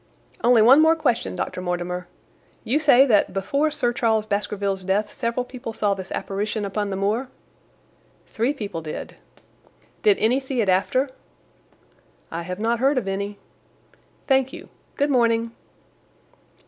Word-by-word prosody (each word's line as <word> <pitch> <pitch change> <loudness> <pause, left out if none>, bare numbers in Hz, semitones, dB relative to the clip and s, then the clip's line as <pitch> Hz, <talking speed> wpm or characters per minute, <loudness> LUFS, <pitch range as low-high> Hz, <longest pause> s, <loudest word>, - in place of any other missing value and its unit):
"Only 235 -2 +6
one 265 +6 +7
more 320 +1 +5
question, 230 - -1
Dr. 180 - -4
Mortimer. 180 0 -3 0.6
You 265 +7 +1
say 275 -3 +6
that 215 -7 +3
before 280 +11 0
Sir 280 -6 -1
Charles 220 -3 +1
Baskerville's 200 -2 -2
death 195 +3 0
several 235 +1 -2
people 250 -2 -8
saw 205 -2 +1
this 190 -1 -8
apparition 210 +2 -3
upon 205 +1 -2
the 195 - -3
moor?" 215 +7 -1 1.0
"Three 235 +5 -1
people 205 - -5
did." 155 -1 -7 0.8
"Did 415 -2 +4
any 240 +5 +2
see 265 -2 -4
it 210 -4 +1
after?" 255 +9 +1 1.2
"I 165 - -4
have 180 +1 -5
not 230 +2 0
heard 270 +2 +2
of 230 -6 -1
any." 200 +1 -3 0.9
"Thank 265 -1 +2
you. - - -10 0.3
Good 285 0 +1
morning." 230 -2 +2
225 Hz, 145 wpm, -23 LUFS, 195-260 Hz, 1.2 s, one